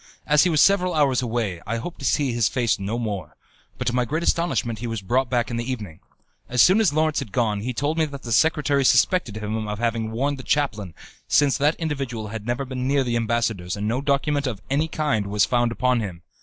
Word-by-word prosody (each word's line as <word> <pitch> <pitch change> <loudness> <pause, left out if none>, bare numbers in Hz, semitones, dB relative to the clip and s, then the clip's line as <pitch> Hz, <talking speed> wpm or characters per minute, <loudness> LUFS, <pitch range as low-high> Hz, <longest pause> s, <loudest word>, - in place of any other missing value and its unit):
As 150 +3 +4
he - - +3
was 155 -3 +3
several 185 -3 +3
hours 140 -5 +2
away, 110 -8 -2
I 115 +2 -1
hoped 165 +9 -7
to 135 - -6
see 135 -3 +1
his 120 -2 +2
face 120 -5 0
no 100 +4 -3
more; 105 -6 -4 0.4
but - - -4
to 120 - 0
my 125 0 +2
great 155 +7 -2
astonishment 165 -11 0
he 120 - -4
was 115 -4 -4
brought 125 +6 +1
back 120 0 0
in 120 - -2
the 120 +2 -3
evening. 105 -11 -6 0.5
As 125 - -2
soon 190 - +6
as 205 - +3
Lawrence 155 0 +1
had 105 - -6
gone, 105 -2 0
he 125 +4 -2
told 145 +6 -1
me 160 - +3
that 140 -2 -8
the 120 - -6
secretary 145 +2 +2
suspected 130 - +3
him 110 0 -3
of 105 0 -3
having 115 -1 -1
warned 135 +5 -1
the - - -7
chaplain, 110 - -1 0.3
since 145 -2 +3
that 150 +3 +3
individual 135 -9 -4
had 110 0 -7
never 120 +3 -1
been 130 -1 -4
near 140 0 +2
the 120 -2 -1
ambassador's 110 -6 -1
and 105 +1 -2
no 120 +4 0
document 140 0 0
of 110 -6 -4
any 150 +3 +1
kind 145 -10 -1
was 105 +1 +2
found 120 -1 +1
upon 125 +1 +1
him. 90 -6 -6
125 Hz, 235 wpm, -23 LUFS, 110-145 Hz, 0.5 s, soon